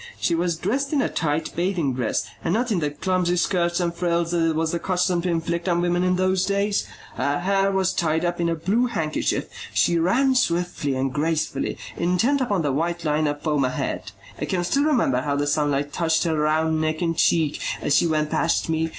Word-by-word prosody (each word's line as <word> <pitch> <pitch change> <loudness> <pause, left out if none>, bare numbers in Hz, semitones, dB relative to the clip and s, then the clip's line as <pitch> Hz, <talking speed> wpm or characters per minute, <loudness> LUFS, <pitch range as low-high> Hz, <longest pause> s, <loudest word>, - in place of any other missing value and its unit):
She 170 - +1
was 170 0 0
dressed 270 - -1
in 285 - +3
a - - +1
tight 155 -1 -2
bathing 170 -6 0
dress 125 -3 -1 0.2
and 165 - 0
not 240 +1 0
in 195 - +1
the 150 -2 0
clumsy 180 +3 0
skirts 175 -1 +1
and 170 -1 0
frills 170 -1 0
that 170 -1 +1
it 160 - -1
was 160 0 0
the 170 - -1
custom 180 -1 0
to 180 - -2
inflict 170 +1 -1
on 170 -1 +2
women 175 0 +1
in 185 0 +2
those 185 0 +1
days. 200 +1 0 0.3
Her 145 +3 0
hair 195 +1 +2
was 190 -1 +1
tied 160 0 0
up 175 0 -1
in 170 - +1
a 165 - 0
blue 205 +10 +1
handkerchief. 160 -10 -1 0.3
She 170 -1 +3
ran 255 +11 +3
swiftly 175 - 0
and 130 0 -1
gracefully, 150 -2 -1 0.2
intent 180 +11 +1
upon 205 -9 0
the 145 - +1
white 170 +4 -2
line 150 0 +1
of 145 0 -3
foam 150 -3 +1
ahead. 130 0 -3 0.3
I - - -2
can 180 -2 -1
still 280 +11 +1
remember 230 - +2
how 140 +1 -1
the 145 0 0
sunlight 145 -1 0
touched 160 -2 +1
her 165 -2 0
round 155 +1 +1
neck 155 +2 -1
and 165 -1 0
cheek 160 -2 +2 0.2
as 145 - +1
she - - +4
went 155 -1 0
past 165 0 +1
me. 160 0 0
170 Hz, 215 wpm, -23 LUFS, 155-185 Hz, 0.3 s, she